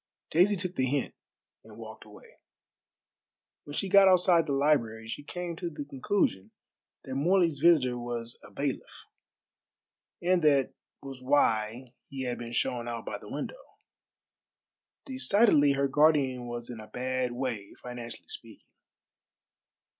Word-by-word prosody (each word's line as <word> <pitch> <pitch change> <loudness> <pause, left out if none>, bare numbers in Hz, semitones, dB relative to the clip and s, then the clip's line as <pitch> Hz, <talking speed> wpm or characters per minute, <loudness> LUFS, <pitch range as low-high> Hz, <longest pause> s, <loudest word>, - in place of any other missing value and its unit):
Daisy 185 +5 +4
took 185 -1 -4
the 130 - +2
hint 140 +1 -1 0.5
and - - -15
walked - - -10
away. - - -17 1.3
When 145 - -8
she 195 - -1
got 195 +1 +7
outside 180 -3 +4
the - - -2
library 130 -6 +1
she 115 - -5
came 175 +2 -5
to 175 - -4
the 150 -3 -7
conclusion 130 - -1 0.5
that 130 - -7
Morley's 165 +1 +2
visitor 140 -7 +4
was 120 -1 -5
a - - -13
bailiff, 140 -1 -5 1.1
and 180 0 +2
that 140 -4 +3 0.3
was 135 -2 -9
why 120 -2 +1 0.2
he 135 -1 -5
had 125 -1 -3
been 120 -1 -7
shown 120 0 -1
out 115 -1 -5
by - - -5
the - - -12
window. - - -7 1.3
Decidedly 205 - +3
her 140 0 +1
guardian 135 -4 +2
was 120 0 -6
in 115 - -8
a 110 - -10
bad 130 0 -2
way 120 -6 -4
financially 120 -1 -8
speaking. - - -10
135 Hz, 140 wpm, -29 LUFS, 120-165 Hz, 1.3 s, got